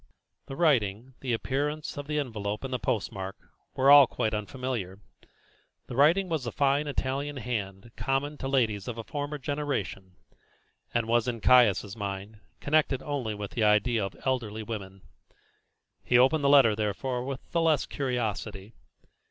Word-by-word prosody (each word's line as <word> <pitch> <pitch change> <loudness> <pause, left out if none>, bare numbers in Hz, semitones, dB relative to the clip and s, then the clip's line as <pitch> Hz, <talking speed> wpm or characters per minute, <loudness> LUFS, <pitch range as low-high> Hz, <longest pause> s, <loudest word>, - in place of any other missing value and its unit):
The 135 - -6
writing, 125 - +1
the 130 - -3
appearance 145 +6 -2
of 145 0 -6
the 150 0 -2
envelope 105 -6 -3
and 135 -1 -4
post 120 -5 -1
mark, 95 -2 -6 0.4
were 135 +2 +5
all 145 -2 +9
quite 110 - -2
unfamiliar. 105 -3 -4 0.9
The 120 - -7
writing 165 +8 +4
was 160 -6 -2
the 120 - -4
fine 140 +1 +1
Italian 140 +1 -2
hand 110 -3 -4
common 145 +2 -2
to 135 - -3
ladies 115 -7 0
of 120 -2 -5
a 115 - -5
former 145 +6 -4
generation, 130 -10 -4 0.8
and 120 -1 0
was, 120 0 +2
in 120 -2 -2
Caius' 105 -5 +4
mind, 100 0 -6 0.2
connected 145 -3 +1
only 130 -7 -3
with 105 -1 -6
the 115 - -1
idea 105 +2 +3
of 95 - -5
elderly 115 -5 -1
women. 95 -4 -7 1.0
He 120 - +3
opened 135 +5 +4
the 140 - +4
letter, 135 -7 +6
therefore, 120 +4 -2
with 135 0 -7
the 170 - +1
less 160 -4 +2
curiosity. 110 -5 -3
125 Hz, 155 wpm, -28 LUFS, 105-140 Hz, 1.0 s, all